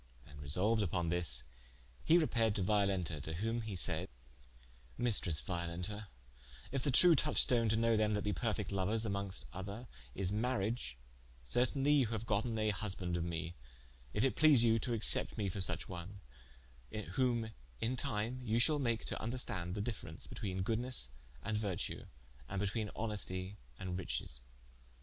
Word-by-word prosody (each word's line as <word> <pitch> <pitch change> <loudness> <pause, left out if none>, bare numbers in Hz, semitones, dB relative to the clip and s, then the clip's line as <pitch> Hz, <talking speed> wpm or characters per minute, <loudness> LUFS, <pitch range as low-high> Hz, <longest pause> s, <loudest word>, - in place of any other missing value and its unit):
And 70 -1 -12
resolued 95 +11 +2
vpon 85 -1 0
this, 80 -9 +2 0.6
hee 165 - +6
repaired 115 -10 +2
to 100 - +1
Violenta, 95 -6 +1
to 80 - -5
whom 115 +6 -1
he 110 -3 -5
said: 90 0 +2 0.9
"Maistresse 100 -10 +2
Violenta, 90 +4 -3 0.6
if 135 0 -1
the 140 - +1
true 170 +6 +8
touchstone 125 -6 +4
to 110 - +3
knowe 115 0 +3
them 105 -1 +2
that 105 - -1
be 105 - 0
perfecte 80 - -1
louers 100 +4 +1
(amonges 100 - -2
other) 100 +6 -6 0.3
is 95 -1 -1
mariage, 110 - -1 0.5
certainly 130 - +2
you 140 -5 +5
haue 110 +1 -2
gotten 110 +1 0
a 110 -1 +2
husbande 95 -3 -3
of 85 - -1
me, 85 0 -3 0.6
if 105 - 0
it 135 - +2
please 145 -6 +6
you 115 -1 +4
to 120 - -2
accepte 110 - +1
me 105 -3 0
for 95 - -4
suche - - -2
one, 95 +2 -7 0.9
whom 120 -4 +1 0.3
in 120 - 0
time 125 -1 -2
you 115 -2 0
shall 150 +5 +4
make 115 -4 0
to - - -3
vnderstande 95 -7 -2
the 105 - -1
difference 100 -8 -5
betweene 95 -2 -3
goodes 120 +5 +1 0.3
and 105 -1 -1
vertue, 100 -5 -3 0.4
and 100 - -2
betweene 105 +2 -1
honestie 100 -3 -2 0.2
and 90 -1 -3
richesse." 65 -8 -3
105 Hz, 160 wpm, -36 LUFS, 90-115 Hz, 0.9 s, true